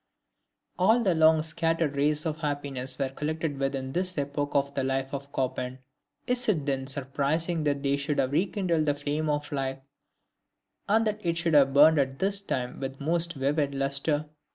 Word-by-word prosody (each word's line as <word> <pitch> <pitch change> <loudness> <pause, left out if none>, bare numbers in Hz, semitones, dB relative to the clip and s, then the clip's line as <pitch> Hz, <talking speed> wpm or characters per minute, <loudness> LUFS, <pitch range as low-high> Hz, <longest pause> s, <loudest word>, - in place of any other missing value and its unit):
All 220 +6 +4
the 190 -4 +3
long 160 -1 +5
scattered 165 -2 0
rays 150 +2 +1
of 155 -1 -2
happiness 140 -4 -3
were 135 -2 -1
collected 150 +1 -3
within 135 -1 -2
this 180 +3 -1
epoch 145 0 -2
of 140 0 +1
the 135 - -1
life 135 +1 -2
of 140 0 -5
Chopin; 130 -1 -2 0.5
is 245 -1 +1
it 155 -9 +1
then 135 -2 -1
surprising 145 +4 -1
that 140 -1 0
they 140 0 +1
should 145 +1 -1
have 130 - +1
rekindled 175 -1 0
the 145 - +2
flame 145 +2 -2
of 145 0 -2
life, 135 -2 -2 1.1
and 220 +2 +4
that 215 0 -2
it 170 -1 0
should 170 -1 0
have 135 -2 +5
burned 155 +2 +7
at 135 -1 0
this 195 +3 0
time 125 -10 -3
with 135 0 -5
the 140 - -8
most 170 +1 +1
vivid 140 0 0
lustre? 140 +2 0
145 Hz, 180 wpm, -27 LUFS, 135-165 Hz, 1.1 s, burned